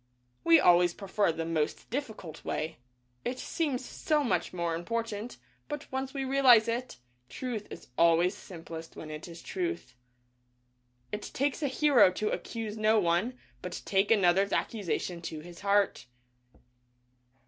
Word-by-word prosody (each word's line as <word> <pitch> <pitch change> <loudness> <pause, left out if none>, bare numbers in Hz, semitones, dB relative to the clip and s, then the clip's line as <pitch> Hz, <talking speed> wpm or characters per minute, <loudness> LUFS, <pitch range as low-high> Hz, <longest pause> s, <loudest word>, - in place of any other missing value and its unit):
We 165 0 +7
always 175 0 +5
prefer 200 -2 +1
the 165 0 -4
most 160 -2 -1
difficult 220 - -5
way. 155 -4 -3 0.4
It 250 - -2
seems 265 -4 -2
so 300 +2 0
much 250 - 0
more 170 -2 -2
important, 225 +5 -3 0.3
but 295 0 -6
once 265 0 -2
we 270 -1 -3
realize 260 -4 +6
it, 245 +2 -3 0.3
truth 240 -5 -4
is - - -10
always 170 +3 +4
simplest 165 -4 -9
when 155 - -8
it 155 +2 -7
is 170 -1 -10
Truth. 355 - -4 1.2
It 210 - -3
takes 280 +3 0
a 290 - +1
hero 275 -8 +5
to 210 +3 -1
accuse 225 -2 -4
no 215 0 +4
one, 185 +7 +1 0.2
but - - -6
take 195 +1 +2
another's 195 -2 +4
accusation 180 -5 -2
to 155 -2 -6
his 170 +1 -11
heart. 200 -10 +1
205 Hz, 140 wpm, -30 LUFS, 170-250 Hz, 1.2 s, We